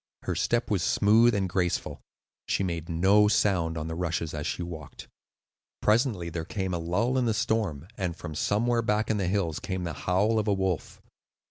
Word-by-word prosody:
Her - - -2
step 120 -1 0
was 100 -4 +2
smooth 110 +5 +4
and 95 -2 0
graceful; 90 -1 -1 0.5
she - - 0
made 85 -2 -3
no 95 +5 +4
sound 90 -6 +1
on 80 0 -3
the 80 - -4
rushes 85 -2 -2
as 75 -1 -3
she 90 - -3
walked. 80 -4 -9 0.7
Presently 105 -6 +1
there 80 0 -3
came 95 +1 -3
a 85 - -1
lull 100 +10 0
in 125 - +1
the 110 -2 +1
storm, 100 -10 -1
and 90 -3 -2
from 75 - -7
somewhere 115 +9 +1
back 110 0 0
in 110 - 0
the 95 -3 -1
hills 90 -5 0
came 95 -2 -4
the 85 - -3
howl 105 +5 +1
of 110 - -2
a 105 - +3
wolf. 95 -4 -2
95 Hz, 195 wpm, -27 LUFS, 85-105 Hz, 0.7 s, smooth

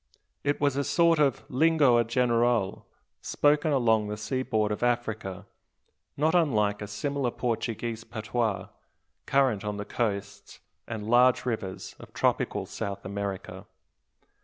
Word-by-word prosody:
It 145 0 0
was 145 -2 +1
a 140 - 0
sort 170 +1 +3
of 140 -4 +1
"lingoa 140 -4 +4
geral" 120 -4 +1 0.3
spoken 150 +1 +2
along 115 -6 +2
the 105 0 -4
seaboard 110 -1 -1
of 105 - -3
Africa, 115 -5 -2 0.7
not 155 +3 +2
unlike 105 - +2
a 105 - -5
similar 135 +5 -2
Portuguese 115 -1 -3
patois, 110 -3 -2 0.6
current 130 -7 +2
on 105 -1 -3
the 105 - -5
coasts 100 -2 -4 0.3
and 110 -2 -5
large 125 +2 +4
rivers 110 -6 -4
of - - -13
tropical - - 0
South 100 -1 -5
America. 100 -1 -5
115 Hz, 125 wpm, -27 LUFS, 105-135 Hz, 0.7 s, lingoa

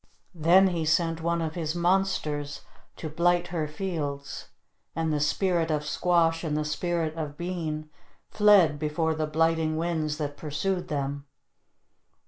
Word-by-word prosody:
Then 180 +3 +5
he 170 -3 -2
sent 165 +1 +1
one 170 0 0
of 155 -1 -3
his 160 -1 -3
monsters 170 -5 0 0.3
to 160 - -6
blight 175 +3 +1
her 160 -3 -2
fields 150 -4 -4 0.5
and 160 -1 0
the 150 - 0
Spirit 170 +2 +1
of 150 -1 -1
Squash 165 +1 +2
and 150 -2 -1
the 150 - -1
Spirit 165 +1 -1
of 150 -3 -5
Bean 165 -4 -4 0.4
fled 195 -8 +5
before 160 +1 0
the 155 0 -2
blighting 160 0 +1
winds 160 -2 -1
that 145 -2 -4
pursued 175 +5 -2
them. 140 -2 -3
160 Hz, 140 wpm, -27 LUFS, 150-175 Hz, 0.5 s, Then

